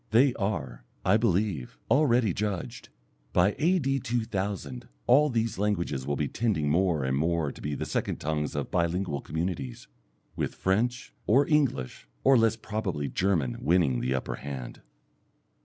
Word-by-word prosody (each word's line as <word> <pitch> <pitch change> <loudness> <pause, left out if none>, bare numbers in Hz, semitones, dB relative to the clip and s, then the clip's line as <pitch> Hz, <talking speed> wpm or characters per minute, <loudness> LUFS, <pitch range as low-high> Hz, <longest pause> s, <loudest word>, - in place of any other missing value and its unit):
They 125 +4 +5
are, 80 - -3 0.2
I 95 +3 +5
believe, 95 - 0
already 125 - +4
judged. 100 -3 -4 0.4
By 95 +3 +3
A.D. 150 -5 +2
2000 115 0 -3 0.2
all 145 +5 +5
these 115 -4 -1
languages 85 -10 -1
will 70 - 0
be 75 0 -1
tending 90 -10 0
more 85 -3 +2
and 65 0 0
more 80 0 0
to - - -13
be 75 0 -3
the - - -3
second - - -1
tongues 75 0 -2
of 70 - -3
bi 85 -2 +2
lingual 85 -4 -2
communities, 80 -6 -4 0.5
with - - -2
French, 120 +6 0
or 135 +6 +4
English, 130 - 0 0.2
or 135 0 +6
less 115 -2 +4
probably 100 -10 -3
German 85 -10 0
winning 80 -7 +2
the 65 +2 0
upper 65 - -3
hand. 65 -3 -7
95 Hz, 150 wpm, -28 LUFS, 75-115 Hz, 0.5 s, or